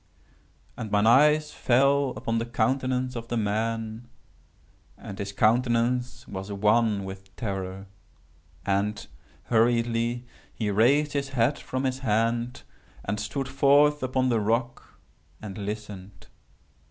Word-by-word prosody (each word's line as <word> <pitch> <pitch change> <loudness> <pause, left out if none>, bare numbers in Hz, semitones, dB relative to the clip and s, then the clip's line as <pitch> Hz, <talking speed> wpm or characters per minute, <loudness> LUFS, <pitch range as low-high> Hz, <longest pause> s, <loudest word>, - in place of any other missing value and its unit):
"And 110 - -5
mine 105 +1 +2
eyes 150 +5 +5
fell 140 +2 +2
upon 115 +1 -1
the 115 - -2
countenance 130 +2 0
of 115 -1 -6
the 120 - -2
man, 110 +2 -2 0.9
and 100 - -9
his 100 -1 -4
countenance 120 +3 +1
was 95 +1 -6
wan 105 0 +2
with 95 0 -10
terror. 95 -2 -4 0.8
And, 100 +2 -1 0.4
hurriedly, 115 +1 +1 0.3
he 105 -2 -2
raised 140 +8 +3
his 140 -1 -2
head 135 +2 +1
from 130 +1 -4
his 130 0 -1
hand, 115 +2 0 0.4
and 105 +1 -2
stood 135 +2 -3
forth 145 +2 +4
upon 130 0 0
the 115 -2 +2
rock 115 +4 -2 0.4
and 100 -3 -8
listened. 100 -2 -7
115 Hz, 120 wpm, -26 LUFS, 105-130 Hz, 0.9 s, eyes